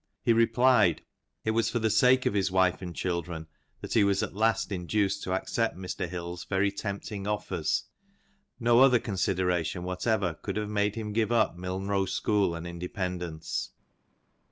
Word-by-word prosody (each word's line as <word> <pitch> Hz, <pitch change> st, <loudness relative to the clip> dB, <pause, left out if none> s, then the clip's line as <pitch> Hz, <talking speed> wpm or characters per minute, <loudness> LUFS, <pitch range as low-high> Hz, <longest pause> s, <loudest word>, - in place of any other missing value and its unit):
He 120 Hz, -, +4 dB
replied, 115 Hz, -5 st, +4 dB, 0.4 s
it 110 Hz, -, +2 dB
was 115 Hz, +1 st, +1 dB
for -, -, -1 dB
the 110 Hz, -1 st, +1 dB
sake 125 Hz, +4 st, +4 dB
of -, -, +1 dB
his 100 Hz, -2 st, +1 dB
wife 95 Hz, -1 st, +2 dB
and 90 Hz, -3 st, -6 dB
children 85 Hz, -2 st, -3 dB, 0.4 s
that -, -, -5 dB
he 110 Hz, -, +5 dB
was 100 Hz, -1 st, +2 dB
at -, -, -4 dB
last 110 Hz, 0 st, +1 dB
induced 100 Hz, +2 st, 0 dB
to 95 Hz, -, -3 dB
accept 115 Hz, +4 st, -1 dB
Mr. 90 Hz, -1 st, -4 dB
Hill's 85 Hz, 0 st, -5 dB
very 100 Hz, 0 st, +1 dB
tempting 100 Hz, 0 st, -5 dB
offers; 105 Hz, -7 st, -1 dB, 0.8 s
no 120 Hz, 0 st, +4 dB
other 130 Hz, -2 st, +7 dB
consideration 90 Hz, -5 st, -1 dB
whatever 90 Hz, 0 st, 0 dB
could 80 Hz, -, -6 dB
have 105 Hz, 0 st, -2 dB
made 105 Hz, 0 st, +1 dB
him 110 Hz, -2 st, -4 dB
give 110 Hz, 0 st, +1 dB
up 115 Hz, -7 st, +2 dB
Milnrow 95 Hz, +1 st, -2 dB
school 100 Hz, -5 st, +1 dB
and 85 Hz, +1 st, -6 dB
independence." 90 Hz, -2 st, -4 dB
100 Hz, 160 wpm, -28 LUFS, 90-110 Hz, 0.8 s, other